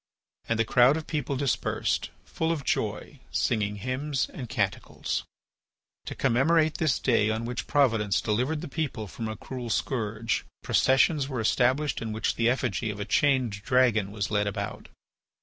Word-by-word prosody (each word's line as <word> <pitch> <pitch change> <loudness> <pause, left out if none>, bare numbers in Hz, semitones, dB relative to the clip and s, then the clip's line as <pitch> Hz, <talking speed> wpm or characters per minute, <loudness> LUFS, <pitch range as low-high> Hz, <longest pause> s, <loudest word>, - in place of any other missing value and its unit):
And 115 - +1
the 115 - +2
crowd 125 +6 +5
of 160 - -5
people 145 -3 -2
dispersed, 140 -1 0 0.2
full 160 0 -1
of 155 -4 -2
joy, - - -2
singing 105 -2 0
hymns 130 +6 -2
and 125 -4 -7
canticles. 100 -6 -2 0.8
To - - -5
commemorate 155 +6 +2
this 155 -5 +2
day 115 -4 +2
on 110 +1 -1
which 125 +1 -4
Providence 115 -9 +2
delivered 125 +8 0
the - - -5
people 140 -7 -3
from 110 +3 -6
a 110 -1 -5
cruel 125 -3 -6
scourge, 115 -2 -1 0.2
processions 135 +2 +3
were 130 -3 -3
established 130 +6 +1
in 110 -2 -3
which 110 - 0
the 115 0 +2
effigy 120 -3 -1
of 105 -1 -5
a 105 - -3
chained 130 -8 +1
dragon 115 -4 +3
was 105 -1 -3
led 105 -1 +1
about. 100 0 -5
120 Hz, 160 wpm, -27 LUFS, 110-140 Hz, 0.8 s, crowd